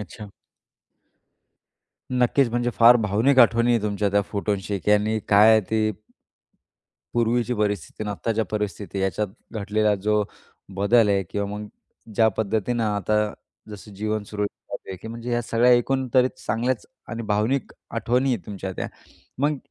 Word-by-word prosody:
अच्छा. 105 +1 -9 1.8
नक्कीच. 125 +1 +3
म्हणजे 120 +1 0
फार 120 +1 +7
भावनिक 115 +5 +2
आठवणी 115 0 +5
आहे 115 - +1
तुमच्या 105 -1 0
त्या 100 0 +2
फोटोशी 100 -1 -2
की 105 - -1
यांनी 105 +1 +2
काय 105 +2 +7
आहे 110 -1 +6
ते 110 -1 +2 1.2
पूर्वीची 120 +1 +1
परिस्थिती 105 -1 -2
आणि 105 - -3
आत्ताच्या 110 +2 -1
परिस्थिती 100 -2 -3
याच्यात 95 +2 -1 0.2
घडलेला 105 0 +1
जो 105 +1 +1 0.5
बदल 105 +2 +4
आहे 100 -1 +2
किंवा 100 -1 -2
मग 105 0 -6 0.5
ज्या 110 - +4
पद्धतीनं 110 +2 0
आता 105 0 0 0.6
जसं 105 0 -10
जीवन 110 +1 -2
सुरळीत 105 0 -3
चालू - - -11
आहे, 95 - -5
की 110 - -10
म्हणजे 115 +1 -6
ह्या 120 0 +1
सगळ्या 115 +2 +3
एकूण 130 +2 +2
तरी 130 0 +5
चांगल्याच 120 0 -2 0.2
आणि 115 0 -5
भावनिक 110 +6 0 0.2
आठवणी 125 +3 0
आहेत 100 - -8
तुमच्या 95 -2 -5
त्या. - - -4 0.5
मग 145 +2 +1
110 Hz, 150 wpm, -24 LUFS, 105-120 Hz, 1.8 s, फार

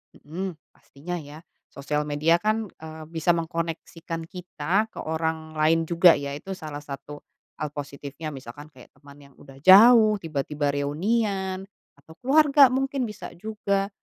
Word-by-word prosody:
Mhm, 180 +4 -6 0.2
pastinya 175 +6 -8
ya, 150 0 -11 0.3
sosial 150 +2 -3
media 155 +4 +2
kan, 215 +2 0
eee, 160 0 -10
bisa 170 +1 +1
mengkoneksikan 165 0 -4
kita 180 +3 -2
ke - - -12
orang 160 0 -3
lain 160 +2 +3
juga 170 +1 +5
ya 140 0 -4
itu 190 +7 -6
salah 155 -4 -7
satu 145 0 -9 0.4
hal 150 -1 -4
positifnya, 145 +1 -7
misalkan 140 +2 -10
kayak 130 -3 -17
teman 140 -1 -16
yang 140 -1 -18
udah 135 -1 -15
jauh, 215 - +8
tiba-tiba 150 -2 -2
reunian, 190 +6 -1 0.3
atau 145 +3 -17
keluarga 280 0 +6
mungkin 270 +1 -1
bisa 210 -3 -7
juga. 200 0 -2
165 Hz, 140 wpm, -25 LUFS, 145-195 Hz, 0.4 s, jauh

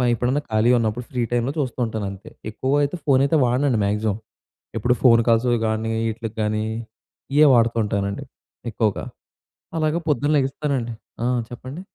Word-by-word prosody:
ఎప్పుడన్నా 130 +5 0
ఖాళీగా 115 +3 +4
ఉన్నప్పుడు 115 +2 -2
ఫ్రీ 125 -2 -1
టైంలో 120 +4 0
చూస్తూ 130 -2 -2
ఉంటాను 110 -3 -3
అంతే. 100 0 -11 0.2
ఎక్కువ 130 +5 -2
అయితే 145 +5 -1
ఫోన్ 135 -2 +4
అయితే 155 +3 +2
వాడనండి 125 -1 +1
మ్యాక్సిమం. 105 0 0 0.6
ఎప్పుడు 120 +3 +2
ఫోన్ 115 -2 +6
కాల్స్‌వి 120 +1 +3
గానీ 110 +1 -1 0.2
ఈట్లికి 115 0 -6
గానీ 110 0 0 0.7
ఇయ్యే 150 0 +7
వాడతుంటానండి, 105 -4 +1 0.5
ఎక్కువగా. 105 -2 0 0.7
అలాగ 155 +1 +1
పొద్దున్న 145 +2 +2
లెగుస్తానండి. 135 -3 -1 0.3
ఆ! - - +1 0.2
చెప్పండి. 130 +7 -8
120 Hz, 140 wpm, -22 LUFS, 110-135 Hz, 0.7 s, ఇయ్యే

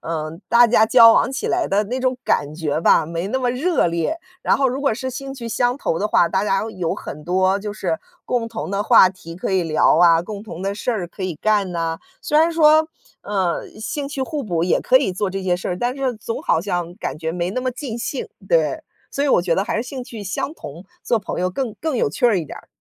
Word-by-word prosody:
嗯， 160 0 -4
大 240 +1 +6
家 220 -1 +4
交 230 0 +8
往 - - +3
起 270 - -3
来 350 -2 0
的 205 +2 +2
那 250 +5 -3
种 255 0 0
感 145 0 0
觉 155 -1 -2
吧， 165 -1 +4
没 170 +3 -4
那 260 - -1
么 250 -2 0
热 305 - +1
烈， 170 - -1 0.2
然 - - +3
后 270 -1 +2
如 260 +2 -3
果 275 -4 +2
是 260 +4 -4
兴 270 +2 -6
趣 235 -4 -7
相 245 +2 +1
投 165 - -1
的 210 - 0
话， 175 - +3
大 190 +2 0
家 195 -1 +1
有 175 -3 -2
很 150 - -8
多 185 +3 +2
就 210 0 -5
是 175 -6 -2 0.3
共 235 -2 -1
同 220 -3 -5
的 200 +1 0
话 190 - +7
题 170 -2 -11
可 190 - -3
以 185 -2 +2
聊 155 0 +3
啊， 165 -1 +6
共 200 +3 -7
同 185 -5 -9
的 195 +1 -2
事 215 - -2
儿 210 -7 -2
可 190 +2 -10
以 180 -5 -3
干 205 0 +1
哪。 165 -1 -3 0.2
虽 300 - 0
然 325 +2 +4
说， 310 -1 +5 0.3
呃， 190 -4 -1
兴 280 +5 -4
趣 285 -2 -5
互 300 0 -3
补 170 -4 -1
也 180 - +2
可 - - +4
以 185 - -1
做 195 +2 -1
这 195 0 -4
些 180 -1 +1
事 180 - -5
儿， 180 - -2
但 245 +4 -1
是 265 -2 -1
总 230 +1 -5
好 160 - +2
像 175 -2 -3
感 - - -5
觉 160 0 -3
没 175 0 -2
那 255 +6 -2
么 255 0 -1
尽 240 -3 -6
兴。 260 +3 -4 0.2
对， - - +2 0.3
所 280 - -1
以 - - +1
我 175 - +4
觉 175 -2 +1
得 195 - 0
还 - - -2
是 225 - 0
兴 260 0 -6
趣 230 -5 -8
相 195 +9 -3
同， 170 - -10 0.2
做 235 - +1
朋 200 - -5
友 180 0 0
更 235 +2 -3
更 310 -5 -1
有 145 - +1
趣 160 - -4
儿 220 -5 +3
一 165 - -3
点 - - -9
儿。 - - -17
205 Hz, 275 characters per minute, -21 LUFS, 175-255 Hz, 0.3 s, 交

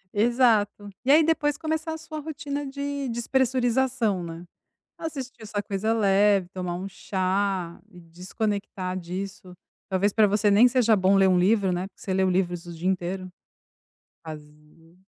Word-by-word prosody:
Exato. 215 -3 +2
E 260 - -3
aí 315 +2 +7
depois 295 -2 +1
começar 315 0 -2
a - - -5
sua 315 -1 -7
rotina 290 -1 -5
de 280 -1 -4
despressurização, 245 -4 +1
né. 165 +1 -8 0.5
Assistir 265 -7 -6
essa 205 -1 -3
coisa 210 +2 -1
leve, 200 -3 +3
tomar 180 -2 -4
um 190 +2 -5
chá 190 -2 -2
e 180 -4 -14
desconectar 185 +2 -4
disso. 185 +1 -7 0.4
Talvez 195 +2 +1
pra 215 -2 +5
você 205 +1 +2
nem 210 +5 +7
seja 235 -3 +3
bom 190 +1 +3
ler 195 -1 +5
um 185 -1 +4
livro, 195 0 +3
né. 180 +2 -2
Porque 190 - -27
você 190 - -3
lê 190 0 +2
livros 180 -2 0
o 175 - -8
dia 170 +3 -3
inteiro. 185 0 -2 1.0
Fazer 150 +2 -13
200 Hz, 155 wpm, -25 LUFS, 185-245 Hz, 1.0 s, aí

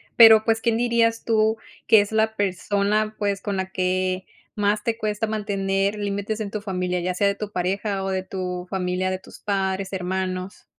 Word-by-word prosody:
Pero, 220 -2 +8
pues, 225 -1 +2
¿quién 230 -1 +1
dirías 230 -1 +1
tú 220 -1 +2 0.3
que 220 - +7
es 205 - -4
la 220 0 +2
persona, 205 +2 0
pues, 200 -1 -1
con 200 -2 -3
la 190 0 -3
que 185 0 0 0.3
más 205 0 +1
te 230 -1 -1
cuesta 215 0 -1
mantener 200 -2 -1
límites 205 +1 -2
en 215 -2 -3
tu 210 - -4
familia, 180 -3 -2
ya 180 +1 -1
sea 200 +3 +2
de 200 - +1
tu 210 0 -6
pareja 195 +2 -1
o 195 - -2
de 190 -1 -1
tu 180 -1 -5
familia, 185 -1 -1
de 185 - -3
tus - - -14
padres, 195 -1 -1
hermanos? 185 0 -3
200 Hz, 190 wpm, -23 LUFS, 185-215 Hz, 0.3 s, Pero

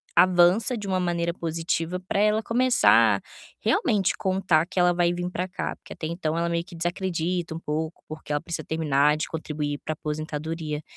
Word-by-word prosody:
a 175 - +8
avança 185 +6 +4
de 205 -2 -6
uma 185 -1 +1
maneira 170 -1 0
positiva 165 +1 -2
pra 195 - -1
ela 215 +1 +3
começar 250 +3 +4 0.4
realmente 215 - +2
contar 185 -4 +2
que - - -12
ela 175 -1 +4
vai 175 0 +2
vim 175 0 -3
pra 180 0 -3
cá, 185 - -4
porque - - -11
até - - -6
então 165 -1 -2
ela 170 0 0
meio 170 0 -1
que 195 - -12
desacredita 175 -1 -2
um 165 - -5
pouco, 160 +1 -4
porque 155 -1 -6
ela 145 - 0
precisa 165 -3 -5
terminar 150 -2 +2
de 155 - -3
contribuir 150 -2 -3
para 155 - -1
aposentadoria. 155 0 -4
170 Hz, 185 wpm, -25 LUFS, 155-185 Hz, 0.4 s, a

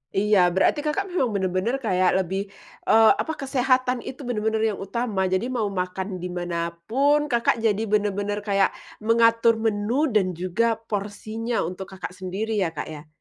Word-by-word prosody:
Iya 205 0 +3 0.2
berarti 190 - +3
Kakak 305 +7 -1
memang 265 -9 +1
bener-bener 190 +5 0
kayak 185 -3 +3
lebih, 190 +3 -2 0.5
eee, 220 0 +7
apa 320 - -3
kesehatan 255 -2 +1
itu 270 +2 -7
bener-bener 220 -1 0
yang 200 - -7
utama. 200 -2 -1
Jadi 185 +5 0
mau 225 -5 0
makan 185 0 -3 0.2
di 180 - -3
mana 175 -1 -4 0.3
pun 290 +5 +3
Kakak 235 -1 +2
jadi 210 0 +2
bener-bener 205 0 0
kayak 195 -1 +3 0.3
mengatur 230 0 +4
menu 225 +7 +1
dan 185 -3 +3
juga 195 +6 0
porsinya 215 +3 -3
untuk 185 +2 -7
Kakak 185 -1 -7
sendiri 195 +4 -3
ya 165 - -1
Kak 160 - -5
ya? 150 -1 -9
210 Hz, 160 wpm, -24 LUFS, 190-235 Hz, 0.5 s, eee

